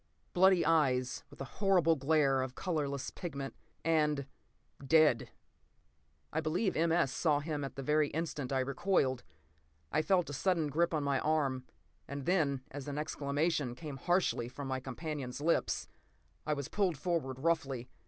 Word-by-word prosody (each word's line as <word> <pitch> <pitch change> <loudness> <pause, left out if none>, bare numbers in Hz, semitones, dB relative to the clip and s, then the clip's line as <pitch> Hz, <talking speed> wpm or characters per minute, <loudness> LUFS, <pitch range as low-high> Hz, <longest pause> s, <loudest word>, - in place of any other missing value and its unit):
Bloody 185 -1 +5
eyes, 130 -6 +2
with 145 - -16
a 135 - -9
horrible 180 -5 +4
glare 140 -2 +2
of 130 0 -4
colorless 145 -7 -2
pigment. 140 -6 -5 0.3
And—dead. 150 -2 +1 1.0
I 160 - +1
believe 175 +6 0
M. 165 +1 +2
S. 165 -5 +2
saw 150 0 +2
him 150 -1 -3
at 135 - -5
the 135 - -5
very 150 +2 +3
instant 150 -4 -3
I 135 -1 +2
recoiled. 135 -1 +1 0.7
I 155 - +2
felt 180 -1 +2
a - - -5
sudden 165 0 +1
grip 170 +4 +1
on 155 -3 0
my 140 -2 +1
arm; 140 -4 0 0.4
and 140 0 -5
then, 150 -7 +2
as 145 0 -7
an 145 0 -4
exclamation 145 -2 -1
came 145 0 -7
harshly 175 -7 +1
from 135 +2 -7
my 130 0 -1
companion's 135 0 -5
lips, 165 +3 +1 0.6
I 155 - +2
was 140 -2 -4
pulled 190 -7 0
forward 150 -5 -1
roughly. 135 -5 0
150 Hz, 155 wpm, -33 LUFS, 135-165 Hz, 1.0 s, Bloody